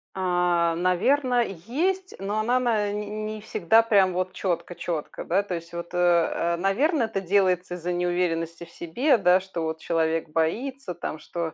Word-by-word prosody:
А, 175 -2 +1
наверно, 245 - +2
есть. 320 - -2
Но 205 +2 -2
она 245 +4 +2
на 220 -4 +1
н 210 +1 -4
не 215 0 -5
всегда 220 +2 +3
прям 200 -5 +3
вот 185 +1 -2
чётко 175 -2 -3
чётко, 165 -4 -4
да 190 +4 +1
то 185 -3 -4
есть. 170 0 -8
Вот, 170 +1 -6
э, - - -2
э, 170 -1 +2
наверно, 245 - +1
это 220 -3 -2
делается 185 -1 +1
из-за 180 0 -3
неуверенности 175 -1 -1
в 165 - -19
себе, 240 - +1
да. 180 -1 +4
Что 190 -2 -6
вот 160 0 -3
человек 165 -1 0
боится 190 - -2
там, 155 - -5
что, 165 0 -5
180 Hz, 170 wpm, -25 LUFS, 170-215 Hz, -, да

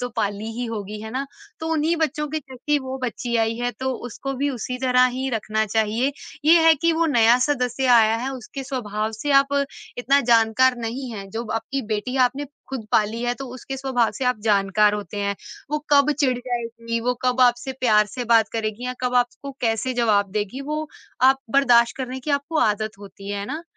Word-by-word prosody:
तो 245 - -2
पाली 210 0 -2
ही 245 +2 -4
होगी, 210 -2 -5
है 220 0 -7
ना? 265 +4 -3 0.3
तो 320 - -4
उन्हीं 320 +2 +1
बच्चों 305 -2 -1
के 315 +2 -2
जैसी 275 +1 -2
वो 265 -1 -5
बच्ची 240 0 -3
आई 225 0 +1
है, 245 +1 -1
तो 260 +1 -3
उसको 275 +3 -5
भी 280 +2 -1
उसी 250 0 -4
तरह 250 -1 +4
ही 265 +1 -2
रखना 220 -1 -1
चाहिए। 220 +6 0 0.3
ये 330 +2 +7
है 325 - +8
कि 335 +3 +1
वो 330 +1 +1
नया 235 -5 +5
सदस्य 260 -2 0
आया 225 -1 +4
है, 250 +4 -3
उसके 265 +2 -7
स्वभाव 215 -5 -3
से 255 +7 -4
आप 275 0 -4 0.5
इतना 275 +3 +3
जानकार 230 +3 +4
नहीं 240 +3 -4
हैं, 195 -2 -7
जो 225 +4 -4
आपकी 225 +5 -3
बेटी 230 +5 -2
आपने 280 +3 -6 0.2
खुद 255 -5 -5
पाली 220 +2 +2
है 245 0 0
तो 270 - -7
उसके 270 +1 -6
स्वभाव 260 -4 +1
से 265 - -4
आप 250 -2 +1
जानकार 205 0 +3
होते 205 -1 -6
हैं। 200 0 -1 0.4
वो 300 - 0
कब 285 0 +5
चिढ़ 255 -4 +2
जाएगी, 230 -2 -4
वो 250 +2 0
कब 250 0 +1
आपसे 245 +1 +3
प्यार 215 -4 +4
से 245 +4 -5
बात 225 -2 +5
करेगी 220 +1 -3
या 250 - -2
कब 250 0 -1
आपको 245 +3 0
कैसे 225 +2 0
जवाब 210 -5 +2
देगी 210 +5 -3
वो 305 +2 -3 0.3
आप 265 +1 +5
बर्दाश्त 240 -3 +4
करने 260 0 -5
की 300 - -4
आपको 285 +3 0
आदत 215 -2 0
होती 200 0 -10
है 200 0 -3
ना? 310 +7 -5
245 Hz, 205 wpm, -23 LUFS, 220-270 Hz, 0.5 s, है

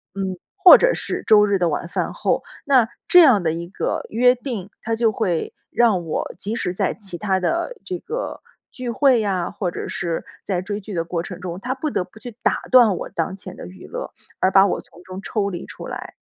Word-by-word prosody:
嗯， 190 -1 -2 0.2
或 365 - +10
者 - - +3
是 - - -4
周 210 -1 +6
日 200 -1 +2
的 175 -2 +2
晚 160 +2 -2
饭 - - -2
后， - - 0 0.2
那 255 -5 +4 0.2
这 360 - +8
样 255 - +6
的 160 - +1
一 170 +1 -5
个 195 - -2
约 250 +3 +4
定， 235 -7 -5
它 225 0 -1
就 225 -1 +2
会 180 -7 -1 0.2
让 215 -7 +3
我 155 - -3
即 210 +3 -4
使 180 -6 -2
在 - - 0
其 195 -5 -8
它 190 0 0
的 340 - -1
这 365 - -3
个 480 +3 -5 0.3
聚 250 -1 -5
会 255 +1 +4
呀， 190 -4 -1
或 180 -4 -3
者 - - -5
是 170 -2 -3 0.2
在 185 -3 -1
追 205 +2 -4
剧 205 +1 -8
的 165 -2 0
过 170 0 -3
程 180 -1 -8
中， 180 -1 -6
它 250 +5 -2
不 270 +4 -3
得 225 - -1
不 185 +4 -17
去 245 +1 -8
打 - - +1
断 240 -6 +7
我 - - -6
当 165 +3 -2
前 195 - -10
的 - - -9
娱 90 +1 -12
乐， - - -6 0.3
而 185 - +3
把 195 0 +7
我 - - -1
从 175 - -17
中 185 +1 -8
抽 200 0 -1
离 175 -2 -6
出 - - -9
来。 - - -7
200 Hz, 245 characters per minute, -22 LUFS, 180-240 Hz, 0.3 s, 或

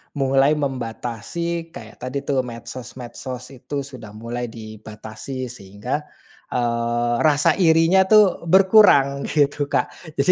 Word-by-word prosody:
mulai 135 +1 +3
membatasi 140 +5 -4
kayak - - -11
tadi, 130 +3 -4
tuh, 135 -2 0
medsos-medsos 125 +1 -8
itu 140 +2 -5
sudah 125 -6 -11
mulai 120 +2 -5
dibatasi, 110 +3 -8
sehingga, 120 +8 -5 0.5
eee, 120 0 0
rasa 150 +3 +3
irinya 165 +2 +5
tuh 205 -5 +4
berkurang, 185 -8 +5
gitu, 145 -1 +1
Kak. - - 0 0.3
Jadi, 140 +6 +3
130 Hz, 110 wpm, -22 LUFS, 120-150 Hz, 0.5 s, irinya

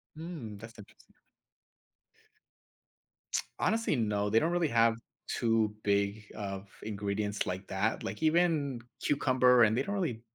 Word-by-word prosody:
Hmm, 155 -11 -7
that's 115 +3 -12
interesting. 100 - -17 2.4
Honestly, 225 -8 +1
no, 105 -3 0
they 110 +2 +4
don't 165 - +1
really 175 -2 +2
have 115 -2 +3 0.3
too 115 -3 +1
big 100 +1 +1
of 100 -2 -5 0.2
ingredients 105 0 -2
like 95 +2 -4
that, 95 +4 -1
like, - - -5
even 155 -6 +2 0.2
cucumber, 130 -3 +4
and 110 0 +4
they 130 - +2
don't 200 +5 -3
really 155 - -2
115 Hz, 130 wpm, -31 LUFS, 105-145 Hz, 2.4 s, they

